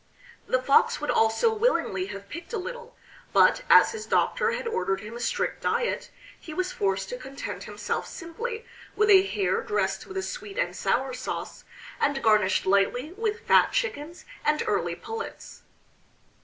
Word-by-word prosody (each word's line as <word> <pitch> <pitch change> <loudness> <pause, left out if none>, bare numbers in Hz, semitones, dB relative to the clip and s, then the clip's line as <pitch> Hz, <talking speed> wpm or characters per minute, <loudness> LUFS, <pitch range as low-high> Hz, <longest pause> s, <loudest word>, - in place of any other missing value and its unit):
The 255 - +2
Fox 275 +2 +3
would 295 - -1
also 225 - +3
willingly 335 - +1
have 200 0 -8
picked 335 - -9
a - - 0
little, 480 +5 -7 0.4
but - - +5
as - - +7
his 440 -1 -7
doctor - - +2
had 485 -1 -3
ordered 195 - -1
him 215 +2 -8
a - - -6
strict 235 - -1
diet, 480 - -1 0.3
he 310 - -9
was 370 +1 -1
forced 195 -1 -1
to 250 - -5
content 270 +2 -7
himself - - -3
simply 445 +7 -6 0.3
with 425 0 +4
a 380 -1 +9
hare 390 0 0
dressed 425 - -1
with 385 - -7
a 380 - -1
sweet 420 -4 -6
and - - -1
sour 265 0 0
sauce, 255 - -5 0.3
and 275 -2 0
garnished 210 -3 +3
lightly 200 - +2
with 435 +3 -3
fat - - +5
chickens 350 -10 -3 0.2
and 300 0 +2
early - - 0
pullets. 450 +1 -8
335 Hz, 165 wpm, -26 LUFS, -, 0.4 s, a